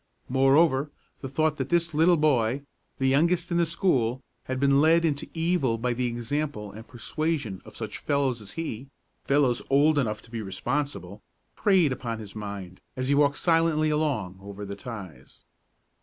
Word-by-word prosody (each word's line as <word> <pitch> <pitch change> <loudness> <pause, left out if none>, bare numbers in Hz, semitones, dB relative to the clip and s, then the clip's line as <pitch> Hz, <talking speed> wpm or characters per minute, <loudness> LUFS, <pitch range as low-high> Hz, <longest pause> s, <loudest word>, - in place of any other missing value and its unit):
Moreover, 135 +2 +4 0.3
the 135 - -6
thought 155 +2 +1
that 130 0 -3
this 170 -1 +1
little 165 +3 +4
boy, 135 -3 +2 0.3
the 135 - -1
youngest 170 +6 +2
in 170 - +2
the 170 -1 +3
school, 130 - +1 0.3
had 130 0 -3
been 140 0 +4
led 165 +2 +4
into 150 -2 -1
evil 165 -8 +1
by 120 +2 -1
the 125 +1 -1
example 120 -2 -3
and 110 +3 -11
persuasion 130 - -3
of - - -13
such - - -5
fellows 135 -5 0
as 100 - -9
he, 140 -6 -5 0.4
fellows 135 -3 +2
old 145 +2 +4
enough 110 -5 -2
to 115 - -16
be 115 -2 -4
responsible, 100 -1 -3 0.3
preyed 185 -8 +3
upon 120 -3 -3
his 105 -2 -10
mind, 100 -4 -7 0.2
as 130 +1 -2
he - - +4
walked 145 0 +3
silently 165 -2 +2
along 130 -12 -1
over 100 +1 -8
the 100 0 -6
ties. 100 - -10
135 Hz, 170 wpm, -26 LUFS, 115-155 Hz, 0.4 s, Moreover